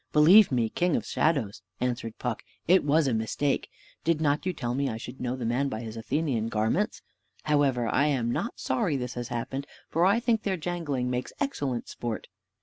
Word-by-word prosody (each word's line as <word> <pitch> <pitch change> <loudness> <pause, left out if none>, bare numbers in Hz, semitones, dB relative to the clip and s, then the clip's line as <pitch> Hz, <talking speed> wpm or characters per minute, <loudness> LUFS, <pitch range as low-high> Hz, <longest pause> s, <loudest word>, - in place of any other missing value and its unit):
"Believe 175 +7 +7
me, 120 -3 +2
king 175 +7 +1
of - - -1
shadows," 120 - 0 0.2
answered 120 -3 -2
Puck, 125 -3 -3 0.3
"it 185 +3 +5
was 150 +2 +3
a 130 - +1
mistake; 115 +6 0 0.3
did 165 -1 +2
not 150 +2 +1
you - - +2
tell 120 -8 -3
me 140 +2 0
I 110 - -3
should 125 +3 -8
know 125 0 -1
the 125 -3 -4
man 130 +5 +1
by 110 -3 -4
his 110 -1 -7
Athenian 115 -1 -1
garments? 110 0 0 0.4
However, 140 -5 +2
I 140 +5 +2
am 125 -5 +1
not 235 - -3
sorry 185 - 0
this 125 -1 -4
has 120 -1 -4
happened, 130 +3 -4 0.2
for 165 - +2
I 200 +5 +5
think 235 -2 +1
their 195 -3 -1
jangling 155 -7 -2
makes 125 0 -3
excellent 140 - -2
sport." 120 -2 -5
135 Hz, 195 wpm, -28 LUFS, 120-160 Hz, 0.4 s, Believe